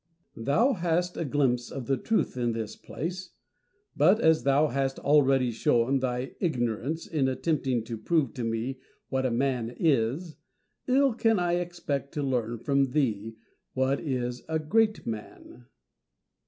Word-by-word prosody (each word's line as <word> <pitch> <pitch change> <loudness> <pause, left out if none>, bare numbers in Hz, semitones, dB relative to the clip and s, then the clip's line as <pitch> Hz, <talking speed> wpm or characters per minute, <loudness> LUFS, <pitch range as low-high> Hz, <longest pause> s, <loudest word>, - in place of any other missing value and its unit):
Diogenes. 115 - -9
Thou 235 - +4
hast 175 -2 0
a 165 - -1
glimpse 130 -4 +1
of 135 -3 -5
the 135 - +1
truth 225 - 0
in 120 -2 0
this 110 -2 -4
place, 180 +4 -6 0.6
but 205 +4 +5
as 160 -5 +4
thou 140 +2 +3
hast 135 +1 -1
already 135 -4 +3
shown 120 +3 +2
thy 125 0 -2
ignorance 135 - -1
in 145 -5 0
attempting 130 -2 0
to 115 -1 -6
prove 150 -4 +1
to 125 - -4
me 115 +4 -2 0.3
what 130 -1 0
a - - 0
man 125 -1 -1
is, 150 +3 +1 0.5
ill 270 0 +4
can 225 -1 +2
I 175 -1 +1
expect 170 -5 -4
to 145 - -1
learn 120 -3 -1
from 135 +2 +1
thee 115 -7 0 0.4
what 130 +1 +1
is 125 -4 -3
a 160 - +1
great 215 +8 +1
man. 115 +2 -8
135 Hz, 155 wpm, -28 LUFS, 120-160 Hz, 0.6 s, but